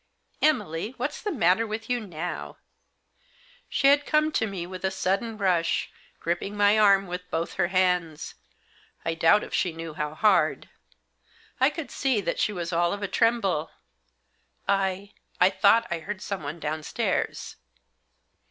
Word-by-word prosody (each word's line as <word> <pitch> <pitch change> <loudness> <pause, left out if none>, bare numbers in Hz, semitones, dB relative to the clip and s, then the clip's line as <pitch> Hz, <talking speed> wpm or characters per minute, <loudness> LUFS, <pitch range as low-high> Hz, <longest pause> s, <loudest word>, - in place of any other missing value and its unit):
Emily, 225 - 0
what's 285 +5 -3
the 415 - -2
matter 220 - +2
with 220 +1 -5
you 245 -1 0
now? 180 -5 -6 0.5
" - - -36 0.3
She - - -1
had 285 +1 +6
come 305 +1 +2
to 225 -7 0
me 190 -4 -5
with 185 +1 -8
a 190 - +2
sudden 195 +4 -1
rush, 180 -5 +1 0.3
gripping 175 +5 -3
my 205 +1 +4
arm 200 -2 +5
with 180 0 -6
both 165 -1 -2
her 175 - +1
hands 180 -4 0 0.3
— - - -32
I 165 - 0
doubt 165 +5 +4
if - - -9
she 180 - 0
knew 165 -1 -7
how 150 -1 -4
hard. 210 +5 +2 0.9
I - - +5
could 315 -6 -7
see 265 -5 +1
that 170 -4 -2
she - - +1
was 175 -3 -4
all 170 +1 +2
of 200 0 -5
a - - 0
tremble. 200 -9 +1 0.6
" - - -44
I 195 0 0
— - - -36
I 185 +2 +5
thought 200 +4 +4
I 170 - -1
heard 200 +4 -6
someone 170 -5 -5
downstairs." 155 0 -2
190 Hz, 165 wpm, -26 LUFS, 170-220 Hz, 0.9 s, had